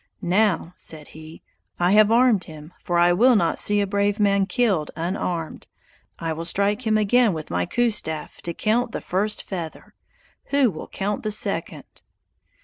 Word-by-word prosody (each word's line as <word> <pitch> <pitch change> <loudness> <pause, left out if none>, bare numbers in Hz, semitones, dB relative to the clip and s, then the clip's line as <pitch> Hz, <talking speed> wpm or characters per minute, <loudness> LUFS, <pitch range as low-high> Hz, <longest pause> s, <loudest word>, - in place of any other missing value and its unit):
"Now," 185 -1 +1
said 155 -2 -5
he, 155 +1 -13 0.4
"I 175 +1 +2
have 215 +1 +5
armed 235 -5 +3
him, 155 +1 -12
for 175 - -1
I 175 +1 +4
will 240 +7 +4
not 170 -5 +1
see 205 0 +2
a - - +1
brave 200 +1 0
man 200 -1 +2
killed 200 - 0
unarmed. 170 -1 -4 0.5
I 165 -1 -3
will 165 +1 -5
strike 200 +7 0
him 215 0 +3
again 215 +1 +3
with 155 -2 -7
my 90 0 -1
coup 240 -1 +1
staff 160 -7 -3
to 170 - -4
count 230 +2 0
the - - -4
first 205 +4 -1
feather; 170 -5 -7 0.5
who 280 -5 +2
will 155 - -8
count 205 +2 -3
the 215 - -3
second?" 215 - -1
200 Hz, 170 wpm, -23 LUFS, 165-215 Hz, 0.5 s, have